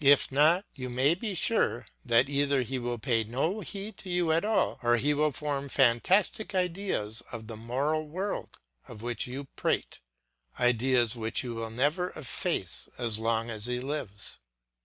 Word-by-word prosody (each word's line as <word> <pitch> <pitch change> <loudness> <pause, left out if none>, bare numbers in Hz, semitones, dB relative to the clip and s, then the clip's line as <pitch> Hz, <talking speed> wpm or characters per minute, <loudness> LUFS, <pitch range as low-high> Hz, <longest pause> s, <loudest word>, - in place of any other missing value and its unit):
If 140 0 +5
not, 160 +8 +4
you 130 -2 -6
may 130 +5 +3
be 195 +2 -4
sure 160 - +1 0.2
that 120 +2 +4
either 140 -1 +2
he 130 +2 -3
will 120 0 -2
pay 115 -1 +1
no 135 - -1
heed 200 +2 -5
to 190 - -8
you 175 -2 +1
at 165 +3 +2
all, 215 +1 +1
or 120 0 +3
he 145 +6 +2
will 150 +1 +2
form 140 -1 -3
fantastic 180 - +2
ideas 180 - -1
of 110 - -7
the 110 0 -7
moral 140 +8 -1
world 190 +6 -4 0.3
of 105 - -10
which 120 -1 -2
you 130 +3 -5
prate, - - -1 0.6
ideas 125 -1 +3
which 115 +1 0
you 120 -2 -4
will 115 0 -4
never 145 +10 0
efface 140 -6 -2
as 115 -3 -1
long 115 +1 0
as 110 0 -2
he 125 0 -1
lives. 125 -7 -3
135 Hz, 170 wpm, -29 LUFS, 120-160 Hz, 0.6 s, If